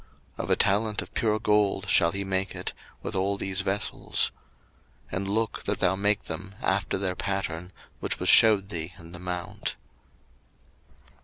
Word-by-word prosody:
02:025:039 - - -1
Of - - -9
a - - +5
talent 105 +2 +2
of - - -15
pure 110 -1 +1
gold 105 -2 +2
shall 85 - +5
he 100 +2 -2
make 95 0 -1
it, - - -3 0.3
with - - -4
all 100 +1 0
these 95 -1 0
vessels. 100 +2 0 0.8
02:025:040 90 - -2
And 95 +1 -2
look 110 +2 -1
that 100 -1 0
thou 95 0 +2
make 105 +1 +1
them 100 +1 -6
after 95 +1 0
their 95 -1 -1
pattern, 95 -3 -3 0.3
which - - -1
was - - -2
shewed 105 -4 +7
thee 85 -2 -4
in 85 0 -12
the 90 - -9
mount. 90 -1 -4
95 Hz, 170 wpm, -27 LUFS, 90-100 Hz, 0.8 s, shewed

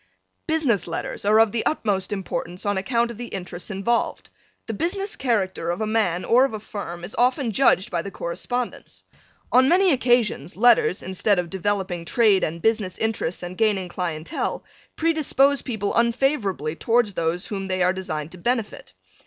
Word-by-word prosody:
Business 295 - +1
letters 165 +3 -5
are 215 +2 +5
of 225 -2 +5
the 230 - -1
utmost 200 -10 0
importance 185 -2 -4
on 205 0 +1
account 235 +4 0
of 230 - -11
the 240 - -5
interests 180 -2 -6
involved. 210 +4 -1 0.3
The 225 - -4
business 390 - -2
character 195 -9 -1
of 175 - -1
a 220 - 0
man 210 -5 0
or 250 +3 +5
of 270 - 0
a - - -5
firm 175 -5 -7
is 180 - -6
often 250 0 +2
judged 215 -5 +3
by 170 -2 0
the 200 - -6
correspondence. 240 +7 -5 0.5
On 260 +2 +5
many 370 +1 +5
occasions 240 - +1
letters 240 -4 +4
instead 190 +2 +1
of 175 -2 -2
developing 190 -2 -2
trade 210 -2 +3
and 165 +2 -3
business 215 -5 +1
interests 220 -6 -2
and 175 +1 -6
gaining 200 -4 +1
clientele, 170 -3 -3 0.3
predispose 290 -4 +2
people 220 -5 -2
unfavorably 230 - +1
towards 225 +1 +1
those 170 +1 -1
whom 195 -2 -4
they 185 -1 0
are 180 +1 +3
designed 160 -5 -5
to 185 - -12
benefit. 235 +1 -2
205 Hz, 170 wpm, -23 LUFS, 180-240 Hz, 0.5 s, are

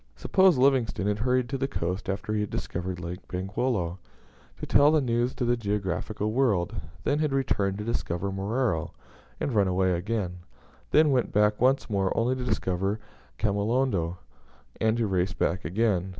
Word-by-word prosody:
Suppose 190 -5 +4
Livingstone 125 -8 +2
had 105 0 0
hurried 125 +2 +1
to 135 0 -2
the 135 - 0
coast 90 -4 -3
after 100 +2 -2
he 105 - +1
had 105 - -2
discovered 90 +1 -4
Lake 85 +1 -5
Bangweolo, 95 -1 -2 0.6
to - - -4
tell 145 +1 +5
the 155 - +4
news 120 -1 0
to 125 - -1
the 120 +1 +3
geographical 105 0 -2
world; 110 -6 +1 0.3
then 145 +1 +1
had 155 -2 +1
returned 105 -8 0
to 105 - -4
discover 100 -4 -2
Moero, 95 -4 -1 0.5
and 135 - -1
run 100 -3 +3
away 95 0 +2
again; 90 0 -2 0.5
then 155 -1 +5
went 125 -3 +1
back 105 +1 +2
once 135 +2 +3
more 100 -3 0
only 120 +3 +2
to 130 - -4
discover 95 -3 -1 0.4
Kamolondo, 100 -4 0 0.6
and 110 +1 +1
to 115 - +1
race 95 -1 0
back 90 0 -1
again. 95 +1 +1
105 Hz, 165 wpm, -27 LUFS, 95-125 Hz, 0.6 s, tell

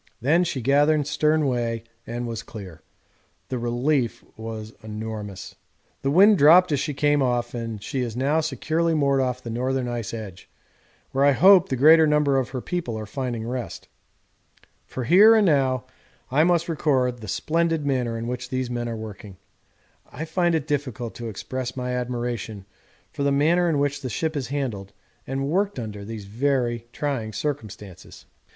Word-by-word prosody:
Then 160 +8 +3
she 145 -6 -3
gathered 145 +2 +3
stern 150 +1 +1
way 120 -3 -1 0.2
and 120 +1 -4
was 115 -2 -4
clear. 95 -7 -10 0.7
The 130 - -2
relief 120 +2 0
was 110 0 -7
enormous. 105 -3 -6 0.5
The 135 - 0
wind 195 +7 +6
dropped 170 +4 +7
as 145 - +1
she 145 - -3
came 145 0 +2
off, 120 -2 0
and 115 -3 -5
she 135 - -3
is 120 -2 -4
now 145 +5 +2
securely 160 +2 0
moored 140 -2 +2
off 125 -1 -2
the 115 - -5
northern 130 +2 -1
ice 120 -3 -4
edge, 105 -6 -8 0.6
where 135 - +1
I 140 0 +5
hope 190 +4 +6
the 130 - 0
greater 155 +4 +6
number 150 -2 +3
of 130 - -3
her 130 - -5
people 165 -10 -3
are 110 - -5
finding 120 0 -4
rest. 125 0 -5 1.0
For 130 - -5
here 200 - +7
and 215 -2 +4
now 135 -6 +2 0.5
I 150 +4 +4
must 170 -1 +2
record 130 -7 0
the 110 - -9
splendid 165 - 0
manner 125 -4 0
in 115 - -4
which 125 +1 -4
these 130 -1 -2
men 120 -1 -3
are 115 - -4
working. 105 -2 -9 0.7
I 160 - -5
find 175 +1 +1
it 155 -3 -1
difficult 130 -6 -3
to 115 -1 -6
express 125 +5 -5
my 125 0 -2
admiration 120 -4 -4 0.5
for - - -5
the 140 0 +2
manner 165 +5 +3
in 155 - +1
which 140 0 0
the 130 - -4
ship 160 +6 -2
is 140 -3 -2
handled 115 -9 -4 0.3
and 135 +1 -2
worked 195 +5 0
under 105 -4 -6
these 110 -1 -7
very 120 +1 -1
trying 125 -8 -3
circumstances. 105 - -6
130 Hz, 170 wpm, -24 LUFS, 115-150 Hz, 1.0 s, dropped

